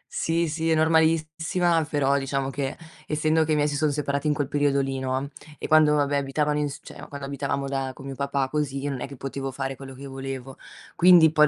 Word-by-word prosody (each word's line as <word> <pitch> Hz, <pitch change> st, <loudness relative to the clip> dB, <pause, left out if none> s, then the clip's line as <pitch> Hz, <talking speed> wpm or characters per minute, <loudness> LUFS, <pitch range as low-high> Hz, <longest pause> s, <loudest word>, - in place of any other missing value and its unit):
Sì, 165 Hz, +1 st, +1 dB
sì, 160 Hz, +1 st, -1 dB
è 160 Hz, -, +4 dB
normalissima, 160 Hz, +1 st, +2 dB
però 140 Hz, -1 st, +2 dB
diciamo 135 Hz, 0 st, -2 dB
che 135 Hz, 0 st, -3 dB, 0.3 s
essendo 155 Hz, +1 st, +2 dB
che 155 Hz, -, +1 dB
i -, -, +3 dB
miei 150 Hz, 0 st, +2 dB
si 145 Hz, -, -2 dB
sono 150 Hz, +1 st, +2 dB
separati 140 Hz, 0 st, -1 dB
in 150 Hz, -, +2 dB
quel 145 Hz, -2 st, -1 dB
periodo 145 Hz, -1 st, +2 dB
lì, 135 Hz, -1 st, -1 dB
no, 130 Hz, +1 st, -2 dB, 0.3 s
e -, -, -5 dB
quando 155 Hz, -1 st, +5 dB
vabbè 145 Hz, -1 st, +2 dB
abitavano 150 Hz, +2 st, 0 dB
ins 145 Hz, -2 st, -3 dB
cioè, -, -, -10 dB
quando 140 Hz, -1 st, -7 dB
abitavamo 140 Hz, 0 st, -2 dB
da 135 Hz, -1 st, -2 dB
con 135 Hz, -, -11 dB
mio 135 Hz, -, -5 dB
papà 140 Hz, 0 st, -1 dB
così, 140 Hz, -2 st, -2 dB
io 145 Hz, -, -1 dB
non 130 Hz, -, -5 dB
è -, -, -3 dB
che 140 Hz, -, -10 dB
potevo 135 Hz, +1 st, -4 dB
fare 135 Hz, 0 st, -4 dB
quello 135 Hz, 0 st, -10 dB
che 140 Hz, +2 st, -9 dB
volevo. 135 Hz, -1 st, -6 dB, 0.4 s
Quindi, 175 Hz, -3 st, +7 dB
poi 150 Hz, -1 st, +5 dB
140 Hz, 225 wpm, -25 LUFS, 135-155 Hz, 0.4 s, Quindi